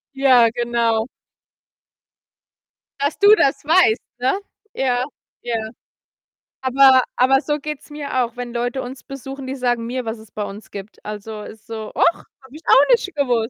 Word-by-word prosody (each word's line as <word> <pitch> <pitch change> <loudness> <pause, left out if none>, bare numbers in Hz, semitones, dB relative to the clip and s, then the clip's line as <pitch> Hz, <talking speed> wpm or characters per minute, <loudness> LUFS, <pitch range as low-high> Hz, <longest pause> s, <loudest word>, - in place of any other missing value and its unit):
Ja, 255 -4 +5
genau. 235 -1 0 1.9
Dass 285 +2 -1
du 410 +1 +8
das 280 -7 +1
weißt, 320 -8 +4 0.2
ne? 260 +9 +1 0.4
Ja, 250 -1 0 0.4
ja. 240 -1 -3 1.1
Aber 260 0 +6
aber 265 +2 +4
so 295 -1 -1
geht's 300 0 -7
mir 285 -3 -2
auch, 235 0 -6
wenn 245 -1 -6
Leute 245 +2 -2
uns 255 +2 -9
besuchen, 270 0 -8
die 265 - -4
sagen 245 -3 -1
mir, 250 0 -3
was 225 0 -4
es 220 -1 -16
bei 210 - -4
uns 205 +2 -9
gibt. 200 +1 -10
Also, 210 +1 -7
ist 215 0 -12
so: 220 -1 -6
„Och, 340 - +4
habe 265 -3 -19
ich 310 - -10
auch 275 +2 +6
nicht 450 -7 +2
gewusst. 245 -5 +1
255 Hz, 160 wpm, -20 LUFS, 230-275 Hz, 1.9 s, du